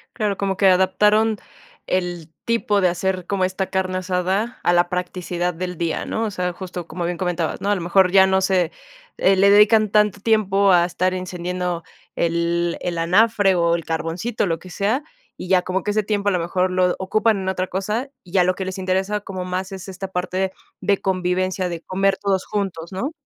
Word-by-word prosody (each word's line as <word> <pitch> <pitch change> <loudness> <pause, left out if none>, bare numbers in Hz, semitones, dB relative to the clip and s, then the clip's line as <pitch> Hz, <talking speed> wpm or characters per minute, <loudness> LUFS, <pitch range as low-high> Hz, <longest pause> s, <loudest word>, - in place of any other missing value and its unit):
Claro, 210 -4 -1
como 195 -2 -1
que 195 - +4
adaptaron 210 +4 +3 0.5
el 175 -3 -2
tipo 220 -3 +1
de 180 - +4
hacer 185 +1 -2
como 190 -1 0
esta 190 +1 -2
carne 185 -1 -1
asada 190 +6 -1
a 175 - +3
la 175 0 +3
practicidad 180 0 -2
del 180 +1 -5
día, 165 -1 -2
¿no? 225 - -2
O 215 - -3
sea, 180 -2 -2
justo 180 -1 -7
como 170 +1 -4
bien 175 0 -2
comentabas, 175 -2 -2
¿no? 200 - -1
A 205 - +3
lo 185 - -4
mejor 180 +1 +3
ya 190 -1 +6
no 190 0 +2
se, 185 -3 +1 0.5
eh, 195 +1 +4
le 200 +1 +5
dedican 210 +1 +5
tanto 210 -1 +2
tiempo 200 -2 +3
a 175 -1 +5
estar 180 +1 -1
encendiendo 180 -1 -3 0.3
el 170 0 0
el 175 -2 -3
anafre 195 +3 +3
o 170 -1 +2
el 165 - -5
carboncito, 165 +8 -2
lo 165 -2 -1
que 185 - -13
sea, 210 +10 -1 0.3
y 180 - -7
ya 185 -1 +4
como 185 +1 -2
que 210 - -1
ese 215 +1 +1
tiempo 205 0 0
a - - +1
lo 180 - +1
mejor 180 +2 0
lo 185 -1 +2
ocupan 215 +3 +1
en 190 -1 -4
otra 185 0 -2
cosa, 210 +9 -2
y 175 - -16
ya 185 - +5
lo 185 +1 +1
que 190 - -4
les 185 0 -5
interesa 190 +2 -1
como 185 -2 -6
más 185 +1 -3
es 190 0 -8
esta 190 0 -6
parte 185 +1 -1 0.3
de 200 -1 +2
convivencia, 185 0 0
de 170 -1 -5
comer 195 +2 0
todos 195 -2 -1
juntos, 190 -5 -4
¿no? 235 - -3
185 Hz, 205 wpm, -21 LUFS, 180-200 Hz, 0.5 s, ya